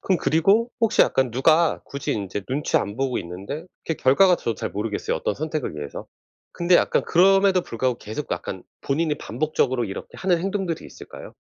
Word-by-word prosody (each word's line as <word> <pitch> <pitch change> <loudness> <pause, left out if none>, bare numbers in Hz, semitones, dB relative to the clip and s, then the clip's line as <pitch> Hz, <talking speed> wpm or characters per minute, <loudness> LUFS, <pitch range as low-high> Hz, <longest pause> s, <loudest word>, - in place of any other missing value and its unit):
그럼 185 - +2
그리고 195 - +3
혹시 225 0 +4
약간 130 -2 +1
누가 155 +7 +3
굳이 140 0 -4
인제 100 -1 -4
눈치 140 +3 0
안 100 +1 -1
보고 135 -1 -1
있는데 100 - -7 0.2
그게 160 - -1
결과가 175 +7 +4
저도 115 - -3
잘 - - -4
모르겠어요, 105 +1 -2
어떤 - - -2
선택을 155 - -3
위해서. 75 -2 -7 0.5
근데 175 +1 +2
약간 - - +2
그럼에도 195 +1 +4
불구하고 120 +1 -2
계속 110 +8 -6
약간 95 -2 -4 0.2
본인이 150 +2 0
반복적으로 135 -5 -1
이렇게 95 -2 -7
하는 180 -2 +1
행동들이 190 -2 -3
있을까요? - - -11
150 Hz, 425 characters per minute, -23 LUFS, 115-175 Hz, 0.5 s, 혹시